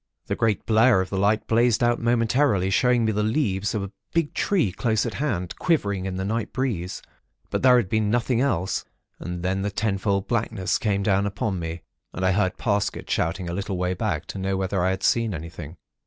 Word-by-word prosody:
The - - -2
great 110 -3 0
blare 115 -1 +5
of 95 0 -2
the 95 - -1
light 105 +2 +2
blazed 115 0 +3
out 120 0 +2
momentarily, 115 -4 +2
showing 125 +2 +3
me 110 - +2
the 105 0 0
leaves 105 -3 0
of 105 - -1
a 100 - -6 0.2
big 165 -3 +1
tree 180 - +1
close 110 +2 0
at 115 - -3
hand, 100 - -2
quivering 100 - 0
in 95 - -4
the 95 +1 -3
night 110 +1 -2
breeze; 110 -9 -3 0.5
but - - -1
there 125 -1 +6
had 115 -6 +1
been 110 +1 +1
nothing 120 +1 +1
else; 95 -10 0 0.4
and 90 0 -5
then 95 +1 0
the 100 - -1
ten 100 -1 -1
fold 100 -1 0
blackness 110 -5 0
came 100 -3 0
down 100 0 +2
upon 100 -1 -2
me, 80 0 -5 0.3
and 95 - -2
I 95 - +4
heard 95 -1 +1
Parsket 100 -3 -1
shouting 85 +2 -1
a 85 - -3
little 100 0 -3
way 90 0 0
back - - -2
to - - -5
know 95 0 -1
whether 95 -1 -1
I 95 - +2
had 95 0 -2
seen 115 -4 +2
anything. 80 0 -8
100 Hz, 215 wpm, -24 LUFS, 95-115 Hz, 0.5 s, there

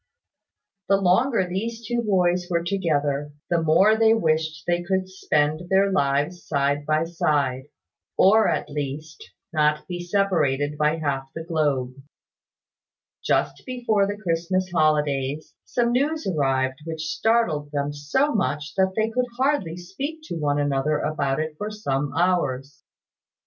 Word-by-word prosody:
The 195 - +5
longer 195 +3 +2
these 225 +6 -4
two 240 +2 -1
boys 180 -4 +1
were 170 -1 0
together, 150 -6 -1 0.2
the 170 -1 +2
more 185 +7 +4
they 225 0 +4
wished 155 -5 0
they 175 0 +1
could 185 +1 -1
spend 155 -2 -1
their 195 +1 +3
lives 145 +1 0
side 145 0 0
by 155 +1 +2
side; 145 -5 0 0.5
or, 215 +3 +5
at - - -1
least, 150 +2 -6 0.2
not 150 -1 +1
be 175 -1 -5
separated 165 -7 0
by 150 +1 +2
half 135 -4 -2
the 165 - -5
globe. 145 -6 0 1.3
Just - - 0
before 235 -6 0
the 205 0 -4
Christmas 185 0 -1
holidays, 150 -2 0
some 240 -1 0
news 295 +6 0
arrived 135 -5 0
which 160 -1 -5
startled 165 -6 +1
them 145 0 -2
so 205 - 0
much 150 -6 -1
that 190 0 +2
they 220 +1 0
could 250 +2 0
hardly 260 - 0
speak 270 - -6
to 310 - -6
one 145 -3 0
another 145 +1 +1
about 140 -2 -1
it 155 0 -2
for 210 - -3
some 145 -10 -2
hours. 145 -7 0
165 Hz, 140 wpm, -24 LUFS, 145-195 Hz, 1.3 s, The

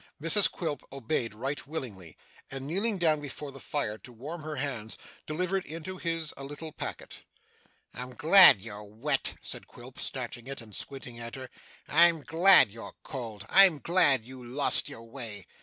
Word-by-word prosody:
Mrs 165 +6 +4
Quilp 155 -6 -4
obeyed 125 -4 -3
right 135 +6 -5
willingly, 105 - -7 0.3
and, 135 0 -6
kneeling 195 +8 +2
down 155 -4 +2
before 145 0 -7
the 135 - -11
fire 110 -9 -3
to 125 - -13
warm 145 +8 -8
her 155 0 -6
hands, 125 -6 -4 0.3
delivered 180 +4 -2
into 165 +4 -7
his 165 -3 -2
a 140 - -8
little 145 +3 -7
packet. - - -7 0.7
'I'm 125 +1 -8
glad 165 - +8
you're 105 -2 -8
wet,' 115 +7 -1
said - - -5
Quilp, - - -14
snatching 120 +1 -5
it, 135 0 -6
and 110 -3 -10
squinting 130 -3 -7
at 115 +2 -7
her. 130 -1 -9 0.4
'I'm 165 -1 +4
glad 170 - +6
you're 115 +2 -10
cold. 115 -6 -7
I'm 190 -5 +6
glad 145 -7 +3
you 130 0 -11
lost 130 +4 +3
your 115 - -10
way. 115 -5 -6
140 Hz, 165 wpm, -28 LUFS, 120-160 Hz, 0.7 s, glad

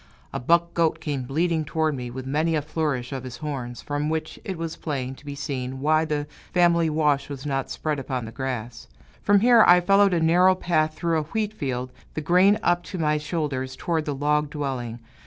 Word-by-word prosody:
A - - -2
buck 170 +6 +2
goat 165 -2 +1
came 140 -4 -3
bleating 160 +4 0
toward 155 0 0
me, 125 -2 -5
with 130 +2 -7
many 155 +4 +1
a 150 - 0
flourish 150 -5 -2
of 130 -1 -4
his 125 -2 -7
horns, 130 -5 -5
from 145 +1 -2
which 160 0 -3
it 190 -3 -4
was 165 -1 -4
plain 135 -4 -4
to 135 - -16
be 140 - -5
seen 130 -2 -4
why 155 +3 +3
the 150 -2 -2 0.3
family 170 -2 +3
wash 150 -3 +1
was 140 -1 -7
not 135 -2 -2
spread 150 -2 -2
upon 130 -3 -3
the 110 - -8
grass. 125 -3 -5 0.3
From 200 -1 +4
here 235 -1 +7
I 175 0 +8
followed 195 +1 +4
a - - +2
narrow 180 +3 +5
path 155 -4 0
through 165 -2 0
a 155 0 -6
wheat 215 -1 0
field, 130 -8 -3 0.2
the 155 - -2
grain 185 +6 +4
up 175 0 +2
to 190 - -6
my 150 -2 +1
shoulders, 145 -4 -3
toward 165 -3 -1
the 145 - -2
log 150 +1 +1
dwelling. 130 -6 -4
150 Hz, 210 wpm, -24 LUFS, 135-170 Hz, 0.3 s, I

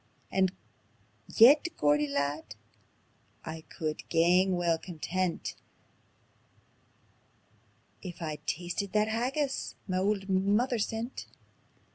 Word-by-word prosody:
And 190 -1 +2 0.8
yet, 280 +8 +7
Geordie 150 0 +3
lad, 140 -4 -2 0.9
I 160 0 -6
could 155 -1 -4
gang 180 +3 +4
weel 170 -2 +1
content 180 +1 -3 2.5
If 180 -3 -8
I'd 155 -3 -5
tasted 180 +3 -3
that 215 0 +2
haggis 265 +5 -1
ma 185 -1 0
auld 195 0 0
mither 205 +6 +2
sent." 225 +4 -3
185 Hz, 90 wpm, -30 LUFS, 160-215 Hz, 2.5 s, yet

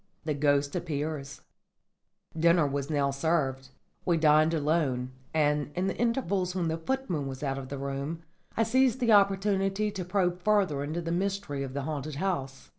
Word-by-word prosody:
THE 155 - 0
GHOST 145 0 +1
APPEARS 150 -4 -3 0.9
Dinner 170 0 +4
was 140 0 -2
now 140 -2 +1
served. 135 -3 0 0.3
We 175 -2 +2
dined 155 0 +5
alone, 145 -5 0 0.2
and, 150 -2 +1
in 180 +1 0
the 195 - -1
intervals 200 -7 0
when 175 -3 0
the 160 - -1
footman 175 - -2
was 130 +1 -6
out 135 -1 -1
of 130 -1 -8
the 140 - -4
room, 140 +4 -4 0.3
I 225 - +4
seized 255 +2 +3
the 240 -3 +2
opportunity 195 0 +3
to 195 -3 -4
probe 180 -1 0
further 190 -8 +2
into 155 +4 -3
the 165 0 -3
mystery 190 -5 -2
of 135 -1 -5
the 140 - -2
haunted 150 0 -4
house. 140 -6 -3
160 Hz, 170 wpm, -29 LUFS, 140-190 Hz, 0.9 s, dined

